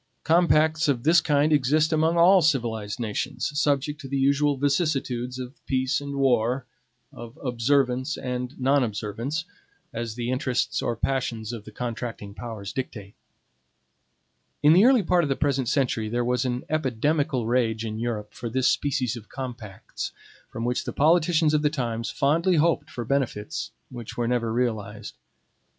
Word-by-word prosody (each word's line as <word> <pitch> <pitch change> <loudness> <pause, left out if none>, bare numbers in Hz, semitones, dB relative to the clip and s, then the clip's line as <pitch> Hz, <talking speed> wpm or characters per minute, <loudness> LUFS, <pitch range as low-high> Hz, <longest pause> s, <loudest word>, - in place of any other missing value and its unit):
Compacts 160 -1 +3
of 130 -5 0
this 165 +2 +5
kind 150 +1 +2
exist 150 +3 +3
among 160 +2 +2
all 180 +3 +6
civilized 115 -8 0
nations, 120 +6 -2
subject 145 0 0
to 135 - -8
the 140 +1 -2
usual 140 +1 +2
vicissitudes 135 -4 0
of 130 +2 -8
peace 130 +1 0
and 140 0 -5
war, 125 -1 +1 0.5
of 120 +4 -10
observance 130 +2 0
and 125 +1 -4
non 135 +1 +3
observance, 115 +8 -3 0.5
as 115 -1 -4
the 120 +1 -2
interests 130 -1 0
or 120 - -1
passions 115 -3 -2
of 110 -3 -7
the 110 - -10
contracting 115 -3 -5
powers 110 -3 -7
dictate. 105 -7 -6 1.5
In 150 +2 +7
the 190 +6 +6
early 255 -4 +5
part 180 0 +3
of 145 - -1
the 135 - +1
present 135 -4 0
century 120 -6 0
there 120 +2 -1
was 125 +1 0
an 125 0 -2
epidemical 145 -2 0
rage 115 -2 0
in 110 0 -4
Europe 115 -3 -3
for 120 - -5
this 130 +2 +1
species 130 -4 0
of 115 -2 -11
compacts, 120 -7 -6 0.4
from 115 - -5
which 125 0 0
the - - -5
politicians 160 0 +3
of 150 - +3
the 150 - +3
times 115 -5 -3
fondly 165 +6 +2
hoped 160 -1 +2
for 120 -4 -6
benefits 110 - -2 0.2
which 120 -3 -8
were 120 -1 0
never 120 -2 0
realized. 115 -3 -2
130 Hz, 160 wpm, -25 LUFS, 115-150 Hz, 1.5 s, In